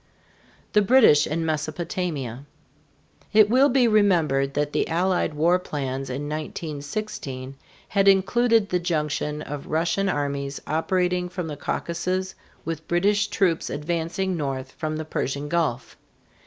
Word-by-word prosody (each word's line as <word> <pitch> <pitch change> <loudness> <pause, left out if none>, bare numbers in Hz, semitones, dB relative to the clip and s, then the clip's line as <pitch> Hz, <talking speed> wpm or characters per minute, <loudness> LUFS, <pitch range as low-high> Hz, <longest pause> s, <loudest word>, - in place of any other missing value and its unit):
THE 210 - +5
BRITISH 210 - +5
IN 160 +1 -2
MESOPOTAMIA. 155 - -3 0.9
It 215 0 +6
will 265 +3 +5
be 250 -1 +4
remembered 165 -11 +2
that 145 0 -1
the - - +1
Allied 175 -2 0
war 170 +4 +3
plans 135 -5 -4
in 130 +3 -3
1916 145 -2 -5 0.3
had 200 -1 +2
included 215 +3 +4
the 180 - +1
junction 150 -3 -2
of 145 -1 -7
Russian 170 +5 0
armies 140 -3 -2
operating 180 +2 0
from 180 -1 -4
the 155 -2 -5
Caucasus 185 +5 -2 0.3
with 160 -1 -5
British 205 +4 +2
troops 175 -6 0
advancing 170 +5 -2
north 135 -4 -3
from 155 -1 -4
the 155 - -4
Persian 140 -1 -3
Gulf. 145 -7 -1
165 Hz, 130 wpm, -24 LUFS, 145-190 Hz, 0.9 s, It